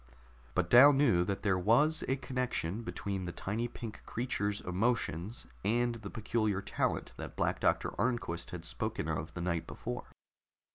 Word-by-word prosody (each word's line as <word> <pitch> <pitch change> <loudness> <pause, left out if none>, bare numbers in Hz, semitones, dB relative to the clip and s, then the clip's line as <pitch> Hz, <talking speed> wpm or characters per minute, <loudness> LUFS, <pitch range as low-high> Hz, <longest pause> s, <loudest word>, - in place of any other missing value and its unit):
But 90 -1 +1
Dal 140 +4 +10
knew 135 -11 +4
that 100 0 -2
there 95 -3 +2
was 125 - +4
a 130 - +2
connection 125 -7 -2
between 100 -4 -4
the 90 - -3
tiny 110 +7 -2
pink 115 -2 -8
creature's 105 -4 -1
emotions 95 0 -1 0.2
and 120 +4 +2
the 110 -3 -7
peculiar 110 -2 0
talent 100 - -1
that - - -7
Black - - 0
Doctor - - +2
Arnquist 115 -9 -1
had 85 -2 -6
spoken - - -2
of 80 - -3
the 90 - -3
night 85 -2 -1
before. - - -5
105 Hz, 155 wpm, -32 LUFS, 90-120 Hz, 0.2 s, Dal